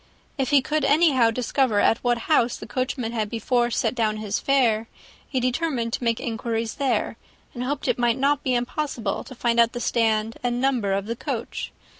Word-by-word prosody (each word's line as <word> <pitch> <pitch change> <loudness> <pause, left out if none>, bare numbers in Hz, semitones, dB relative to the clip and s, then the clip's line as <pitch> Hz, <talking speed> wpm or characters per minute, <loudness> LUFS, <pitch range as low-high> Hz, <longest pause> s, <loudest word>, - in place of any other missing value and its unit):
If 270 -3 -1
he 285 -3 +4
could 305 +1 -1
anyhow 280 -6 +4
discover 245 -1 +1
at 225 - +3
what 240 -1 +1
house 250 -6 +2
the - - -9
coachman 255 -2 -2
had 220 -3 -2
before 240 +2 0
set 240 - 0
down 220 -3 0
his 215 -1 -2
fare, 235 -5 +2 0.4
he 260 - 0
determined 250 -2 -1
to - - -2
make 230 -1 +1
inquiries 225 -1 -3
there, 240 -4 0 0.4
and 245 - -4
hoped 285 +3 -3
it - - +1
might 240 -1 +2
not 280 +1 +2
be 255 -2 0
impossible 240 -3 -2
to 260 - -11
find 235 -1 +1
out 235 0 +4
the 240 - -4
stand 225 -2 0
and 245 0 -1
number 250 -6 +1
of 195 0 0
the 230 +2 -3
coach. - - -4
240 Hz, 195 wpm, -24 LUFS, 225-260 Hz, 0.4 s, he